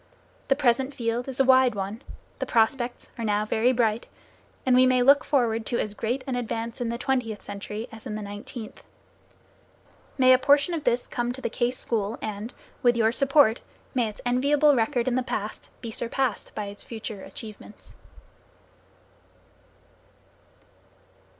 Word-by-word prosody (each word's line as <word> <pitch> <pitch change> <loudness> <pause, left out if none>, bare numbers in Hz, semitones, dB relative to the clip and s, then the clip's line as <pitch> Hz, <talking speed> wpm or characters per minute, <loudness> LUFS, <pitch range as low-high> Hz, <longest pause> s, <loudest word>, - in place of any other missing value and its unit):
The 270 - +3
present 265 0 +1
field 235 +1 -2
is 265 -1 -4
a - - +6
wide 260 -3 +5
one, 200 +4 -4 0.4
the - - -2
prospects 240 +2 0
are - - -2
now 210 -1 +1
very 225 +3 +2
bright, 230 -2 +1 0.6
and 255 -1 +4
we 255 0 +6
may 255 -1 +3
look 280 +3 +6
forward 235 -5 +1
to 240 - 0
as 210 - -2
great 240 +5 -2
an 265 -3 -2
advance 230 -1 -3
in 235 - -1
the 235 - -2
twentieth 245 -5 -1
century, 210 +3 -6
as 225 +2 -10
in 210 - -4
the 215 - -5
nineteenth. 205 +2 -8 1.3
May 255 -1 +7
a 255 - +5
portion 285 +5 +4
of 315 -3 -3
this 245 0 +1
come 240 0 -2
to 260 - -6
the - - -2
Case 245 0 0
School 220 -1 -2
and, 215 +2 -5 0.3
with 240 -1 +4
your 225 -1 +3
support, 275 -3 +4 0.3
may 240 -4 +1
its 210 - -11
enviable 280 +4 +4
record, 235 +1 +1
in 255 - +1
the 255 - +2
past, 215 -4 -5
be 230 - -5
surpassed 240 +1 -2
by 210 - -3
its 200 0 -7
future 220 -3 -7
achievements. 215 0 -10
240 Hz, 165 wpm, -26 LUFS, 220-255 Hz, 1.3 s, May